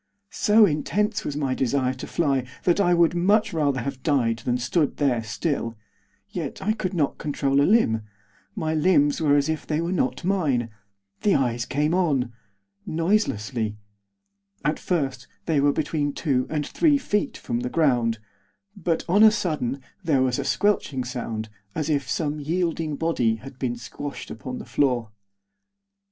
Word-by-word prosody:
So 215 0 +5
intense 210 +6 0
was 145 - -3
my 135 -3 0
desire 130 0 0
to 125 - -8
fly 140 -6 +1 0.2
that 175 +2 +3
I 180 -3 +3
would 170 -1 +4
much 200 +5 +2
rather 145 -5 +1
have 135 0 -5
died 120 -6 +1
than 125 0 0
stood 140 +5 0
there 130 -5 +2
still; 115 +1 -2 0.5
yet - - -4
I 215 - +1
could 190 -4 -3
not 145 -5 0
control 140 -2 +1
a 145 - +3
limb; 155 - +3 0.5
my 160 -6 -1
limbs 155 -2 +3
were 145 -2 +4
as 145 0 +2
if 160 -1 -3
they 150 0 0
were 170 +2 -1
not 135 -3 -1
mine. 145 - +1 0.5
The 205 - +3
eyes 120 -3 0
came 150 +4 0
on, 140 -10 +1 0.5
noiselessly. 125 - 0 0.9
At 150 +1 +1
first 135 -8 -2 0.2
they 160 -4 +2
were 145 0 +4
between 145 -1 -1
two 135 -5 0
and 150 -2 -1
three 305 -4 +3
feet 210 -6 -1
from 120 - -3
the 125 +1 -3
ground; 125 -7 +2 0.6
but, 175 -5 -1
on 190 +5 +4
a 220 - +10
sudden, 145 - -2 0.2
there 145 -6 +3
was 125 -1 0
a - - -1
squelching 175 -10 +1
sound, 115 -3 -4 0.3
as 155 0 -1
if 140 -3 0
some 150 0 -1
yielding 165 0 -1
body 130 -8 +1
had 130 +3 -11
been 125 -2 -1
squashed 125 +4 -7
upon 125 +3 -6
the - - -8
floor. 125 -6 0
145 Hz, 165 wpm, -24 LUFS, 125-170 Hz, 0.9 s, a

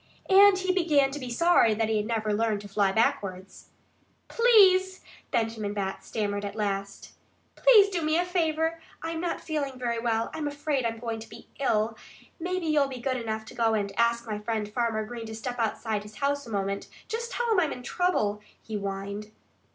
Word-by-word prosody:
And 395 0 +8
he 375 0 0
began 300 -7 +3
to 290 - -5
be 255 -2 -6
sorry 240 -4 +4
that 225 0 0
he 220 0 +1
had 210 0 -1
never 220 -2 -1
learned 215 -1 0
to 205 - -9
fly 200 -1 +1
backwards. 190 -3 -1 0.6
"Please 380 -5 +5 0.2
" - - -27
Benjamin 225 -4 -1
Bat 195 -1 -3
stammered 205 -2 -2
at 205 - -5
last 200 -2 -3 0.4
"please 435 -5 +7
do 365 -4 -2
me 310 +1 +1
a 350 - +1
favor. 325 -2 0 0.2
I'm 325 0 -3
not 350 -1 -2
feeling 285 -5 -3
very 235 -2 -2
well. 230 -1 0
I'm 305 -2 -3
afraid 290 -3 -1
I'm 230 0 -4
going 225 -1 -4
to 220 - -11
be - - -13
ill. 225 -4 +1 0.4
Maybe 365 +1 -2
you'll 300 -3 +3
be 265 -2 -7
good 260 +1 -1
enough 220 -2 -4
to - - -11
go 225 -1 +2
and 200 -2 -2
ask 235 0 +2
my 215 -2 -4
friend 215 -1 -2
Farmer 220 0 -1
Green 230 0 -7
to 220 - -7
step 245 +2 -5
outside 220 -1 -1
his 210 0 -12
house 285 0 -1
a - - -9
moment. 200 -1 -2 0.2
Just 465 +2 -4
tell 475 -1 -1
him 425 - +4
I'm 320 -5 +1
in 250 - -7
trouble," 230 - 0 0.2
he 215 -2 -5
whined. 200 +1 -5
235 Hz, 200 wpm, -27 LUFS, 215-320 Hz, 0.6 s, And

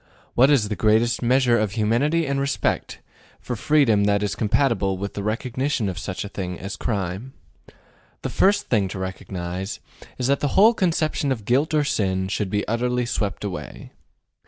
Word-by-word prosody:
What 130 +3 +5
is 130 -8 +3
the 105 - -3
greatest 115 +3 +2
measure 125 -1 +3
of 105 -2 -1
humanity 120 +10 +1
and 140 -1 -1
respect 140 +1 -1 0.4
for 125 - -4
freedom 115 -5 +3
that 100 0 +2
is 105 - -1
compatible 110 -4 +1
with 100 +2 -5
the 100 - -4
recognition 120 +3 -1
of 90 -2 -4
such 95 +2 -4
a - - -4
thing 90 -3 -5
as 95 +2 -5
crime? 100 +5 -3 0.9
The - - -2
first 205 +1 +2
thing 105 -5 +2
to 95 - -6
recognize 95 0 -5 0.4
is 125 - -2
that 140 +2 +2
the 145 - -1
whole 220 +4 +7
conception 160 -7 0
of 110 -6 -3
guilt 145 +7 +2
or 150 - +3
sin 95 -9 0
should 100 0 -2
be 105 +1 -1
utterly 125 +2 0
swept 105 -4 -2
away. 90 -9 -6
110 Hz, 175 wpm, -23 LUFS, 100-135 Hz, 0.9 s, whole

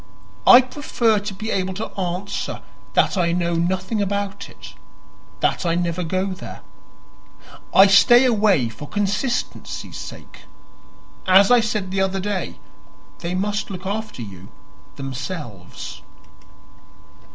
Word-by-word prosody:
I 250 - +10
prefer 250 -4 0
to 205 0 -5
be 215 +3 -4
able 190 -1 -1
to 215 - -5
answer 190 +1 -3 0.3
that 195 - +3
I 170 -1 +2
know 170 -1 0
nothing 185 +5 0
about 200 0 -3
it - - -12 0.7
that - - +1
I 170 -1 +1
never 175 0 -1
go 185 +3 -1
there. - - -9 1.1
I 195 - +8
stay 240 +6 +6
away 205 - +3
for 115 +6 -9
consistency's 205 +5 -2
sake. - - -10 0.8
As 195 +3 +6
I 245 - +7
said 210 -4 -2
the 190 0 0
other 190 0 0
day, 195 -1 -3 0.6
they 175 +2 -3
must 205 +2 -1
look 190 -1 -7
after 205 - -4
you 95 -2 -10 0.5
themselves." 125 - -7
190 Hz, 125 wpm, -22 LUFS, 175-205 Hz, 1.1 s, I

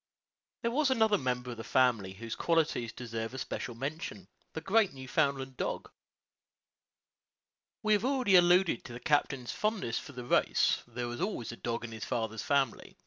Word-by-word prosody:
There 235 - +1
was 285 +2 +2
another 220 -5 +3
member 125 -2 -2
of 120 - -7
the 115 - -6
family 115 -8 +2
whose 115 +3 -6
qualities 160 -9 +1
deserve 115 0 -5
especial 125 -2 -4
mention 155 +9 -5 0.3
the - - -3
great 195 +2 +2
Newfoundland 135 0 -1
dog. - - -3 1.9
We 215 0 +4
have 210 0 +2
already 255 -7 +3
alluded 175 -4 +5
to 120 - -8
the 120 - -7
captain's 140 -3 +1
fondness 215 - -1
for 140 - -10
the 125 -1 -7
race: - - +3
there 120 0 -4
was 120 +5 -5
always 185 - -2
a - - -7
dog 115 0 -3
in 120 - -6
his 110 -1 -6
father's 110 -1 -2
family. 140 -2 0
130 Hz, 165 wpm, -31 LUFS, 120-185 Hz, 1.9 s, alluded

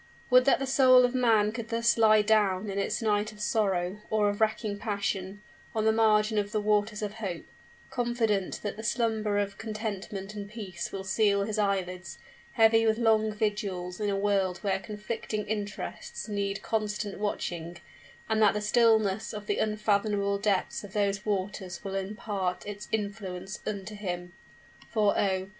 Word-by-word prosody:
Would 250 0 +7
that 275 - +5
the 270 - -2
soul 255 -1 +6
of 245 - -1
man 225 -5 +3
could 230 0 -6
thus 230 0 +2
lie 215 -2 +5
down 205 -2 +2
in 195 - -2
its 200 - -1
night 210 0 +1
of 210 - -15
sorrow 200 -3 0
or 210 -1 +2
of 205 +1 -4
racking 215 -1 0
passion, 200 -1 -3 0.3
on 220 -1 +1
the 220 - +5
margin 215 -1 +3
of 205 0 -2
the 215 - 0
waters 210 +1 +1
of 210 0 -3
hope, 195 -6 -5 0.5
confident 235 -6 0
that 210 - -3
the 220 - -7
slumber 220 -2 0
of 200 0 -2
contentment 210 -2 -5
and 205 -1 -7
peace 195 -6 -6
will 195 -1 -5
seal 200 +1 +2
his 215 +1 -2
eyelids, 185 -6 -1 0.4
heavy 225 0 +5
with 220 0 +3
long 220 -2 +3
vigils 200 -4 -2
in 210 -1 0
a 200 - 0
world 195 -2 +1
where 195 -2 +1
conflicting 210 +1 -4
interests 215 - -5
need 200 -1 -2
constant 210 -2 -2
watching, 175 -5 -3 0.5
and 220 0 +1
that 210 -1 +5
the - - +1
stillness 220 -2 +3
of 210 -1 -6
the - - -1
unfathomable 205 -1 +1
depths 200 0 0
of 200 -2 -10
those 200 -1 0
waters 190 -2 -3
will 195 -1 -5
impart 195 -2 -3
its 205 0 -7
influence 200 -3 -4
unto 200 0 -4
him! 175 -4 -5 0.6
For, 210 -3 +2
oh! 190 -1 0
210 Hz, 165 wpm, -28 LUFS, 195-220 Hz, 0.6 s, Would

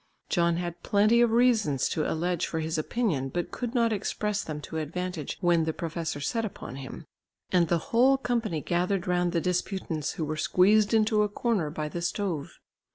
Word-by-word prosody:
John 170 -2 +2
had 175 -1 -4
plenty 215 +3 +4
of 240 - +5
reasons 225 - +3
to 155 - -1
allege 175 +1 -1
for 160 - -3
his 160 0 -1
opinion, 155 - -1
but 175 +4 -3
could 245 0 -4
not 230 -2 +3
express 210 0 -2
them 155 -1 -5
to 160 - -6
advantage 165 0 -4
when 170 -3 +3
the 160 - -1
professor 165 -2 -4
set 225 +11 -1
upon 185 - -6
him, 135 -2 -8 0.5
and 175 -2 +4
the 170 - +2 0.2
whole 260 +4 +5
company 230 - -1
gathered 180 +2 0
round 180 -1 +1
the 170 - +1
disputants, 180 -3 -2
who 160 - -3
were 155 +1 -3
squeezed 205 +7 +4
into 215 -1 +3
a 210 - +1
corner 205 -7 0
by 150 0 -4
the 170 +3 -5
stove. 175 -4 -3
180 Hz, 185 wpm, -28 LUFS, 160-215 Hz, 0.5 s, of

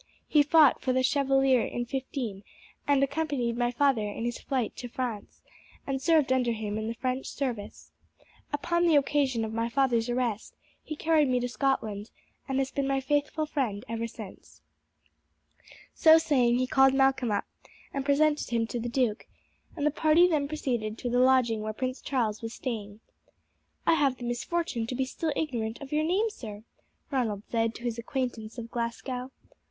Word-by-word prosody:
He 300 - +5
fought 300 -1 +5
for 255 - 0
the 260 0 +2
Chevalier 270 -2 +3
in 240 +2 -3
'15, 250 -6 -4 0.4
and 280 -1 +4
accompanied 280 -5 -1
my 240 0 +1
father 260 -1 +2
in 225 +3 -5
his 240 0 -3
flight 255 -5 -2
to 245 - -5
France, 235 -4 -5 0.4
and 270 -1 -2
served 300 -3 +3
under 250 -2 +1
him 215 -1 -3
in 220 - -3
the 230 - -3
French 255 +2 -2
service. 240 -7 -5 0.6
Upon 340 +4 +1
the 325 - +5
occasion 275 -5 +2
of 220 - -6
my 230 +1 -1
father's 240 -2 +1
arrest 240 -3 -2 0.3
he 310 - -6
carried 310 -1 +3
me 250 -1 +2
to 245 - -1
Scotland, 230 -5 -1 0.4
and 265 - 0
has 270 0 0
been 275 -1 -1
my 275 0 +1
faithful 290 +3 0
friend 245 -9 -2
ever 230 0 -3
since." 215 -4 -12 1.3
So 320 0 +7
saying 255 -7 +3
he 255 - +1
called 270 +1 +4
Malcolm 270 -2 +3
up 205 -1 0 0.5
and 275 - -2
presented 295 +2 +2
him 230 -1 +1
to 240 +1 -4
the 240 +1 -3
duke, 235 -3 0 0.5
and 290 - -1
the 300 - +3
party 315 +4 +4
then 300 -5 +1
proceeded 240 -8 -2
to 245 - -3
the 245 - +2
lodging 250 -4 +4
where 215 0 -3
Prince 255 +3 -3
Charles 225 -6 -1
was 225 0 -6
staying. 215 -4 -5 0.8
"I - - +5
have 280 -5 +2
the 245 - -9
misfortune 240 0 -2
to 250 - -3
be 265 +1 0
still 315 +4 -3
ignorant 235 -8 -2
of 280 -1 -9
your 305 +1 +2
name, 395 +7 +1
sir," 215 - -9 0.5
Ronald 225 -7 -1
said 225 -1 0
to 235 - -10
his 235 -1 -2
acquaintance 235 -2 -4
of 230 -1 -7
Glasgow. 245 +2 -3
255 Hz, 180 wpm, -28 LUFS, 230-280 Hz, 1.3 s, So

